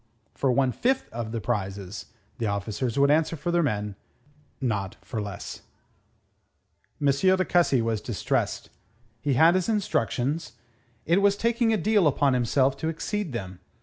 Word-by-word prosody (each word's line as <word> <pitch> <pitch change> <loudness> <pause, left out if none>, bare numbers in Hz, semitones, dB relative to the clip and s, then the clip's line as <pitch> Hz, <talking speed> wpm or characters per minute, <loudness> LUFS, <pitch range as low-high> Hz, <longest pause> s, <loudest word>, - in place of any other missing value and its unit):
For 135 - +1
one 130 0 +2
fifth 260 - 0
of 115 -1 -5
the 115 - -2
prizes, 100 -4 -4 0.3
the 115 - 0
officers 105 +5 -2
would 140 +1 +5
answer 160 +2 +2
for 175 +3 -3
their 175 0 +3
men; 105 -8 -1 0.6
not 105 -7 -2
for 110 - -4
less. 100 -1 -7 1.4
M. 145 - -2
de 185 +6 +3
Cussy 155 -9 +3
was 115 -2 -1
distressed. 115 -5 -2 0.5
He 140 +1 +1
had 165 +6 +6
his 185 +2 0
instructions. 155 - -1 0.5
It 175 +5 +3
was 200 0 +3
taking 230 +1 +1
a 220 - +2
deal 205 -1 +3
upon 140 -1 +2
himself 130 +2 +2
to 160 - -3
exceed 180 +2 -3
them. 95 -6 -6
135 Hz, 150 wpm, -26 LUFS, 110-175 Hz, 1.4 s, had